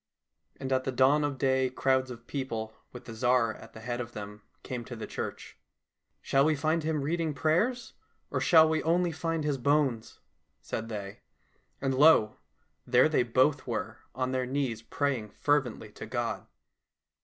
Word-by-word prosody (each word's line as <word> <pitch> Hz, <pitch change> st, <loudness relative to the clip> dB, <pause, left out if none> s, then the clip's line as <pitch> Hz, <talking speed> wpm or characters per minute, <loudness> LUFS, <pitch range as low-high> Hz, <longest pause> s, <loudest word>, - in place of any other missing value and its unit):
And 135 Hz, 0 st, -2 dB
at 130 Hz, 0 st, -1 dB
dawn 140 Hz, +4 st, +4 dB
of 145 Hz, -2 st, -2 dB
day 130 Hz, 0 st, +2 dB
crowds 130 Hz, 0 st, +1 dB
of 120 Hz, -1 st, -9 dB
people, 115 Hz, -6 st, -4 dB, 0.2 s
with 125 Hz, -, -11 dB
the 115 Hz, -, -8 dB
Tsar 120 Hz, -1 st, +2 dB
at -, -, -14 dB
the 110 Hz, -, -11 dB
head 120 Hz, +1 st, -3 dB
of 120 Hz, 0 st, -8 dB
them, 105 Hz, 0 st, -8 dB, 0.2 s
came 125 Hz, -2 st, -5 dB
to 120 Hz, -, -7 dB
the 110 Hz, -, -6 dB
church. -, -, -6 dB, 0.3 s
" -, -, -52 dB
Shall 135 Hz, 0 st, +3 dB
we 155 Hz, +1 st, +3 dB
find 155 Hz, +3 st, 0 dB
him 155 Hz, -1 st, -1 dB
reading 160 Hz, 0 st, -1 dB
prayers, 190 Hz, -, 0 dB, 0.4 s
or -, -, -1 dB
shall 160 Hz, -3 st, +6 dB
we 160 Hz, 0 st, +1 dB
only 175 Hz, +2 st, +2 dB
find 165 Hz, 0 st, -2 dB
his 145 Hz, -3 st, -1 dB
bones? 135 Hz, -4 st, 0 dB, 0.2 s
" -, -, -48 dB
said 115 Hz, 0 st, -3 dB
they. 100 Hz, -2 st, -6 dB, 0.6 s
And 135 Hz, -1 st, 0 dB
lo! 130 Hz, -6 st, +5 dB, 0.5 s
there 125 Hz, +4 st, +5 dB
they 155 Hz, -, +3 dB
both 130 Hz, +4 st, +2 dB
were 110 Hz, -2 st, -4 dB, 0.2 s
on 130 Hz, 0 st, -1 dB
their 130 Hz, -1 st, -1 dB
knees 130 Hz, -4 st, -2 dB
praying 120 Hz, -4 st, -2 dB
fervently 145 Hz, -6 st, 0 dB
to -, -, -9 dB
God. -, -, -3 dB
130 Hz, 175 wpm, -29 LUFS, 120-150 Hz, 0.6 s, shall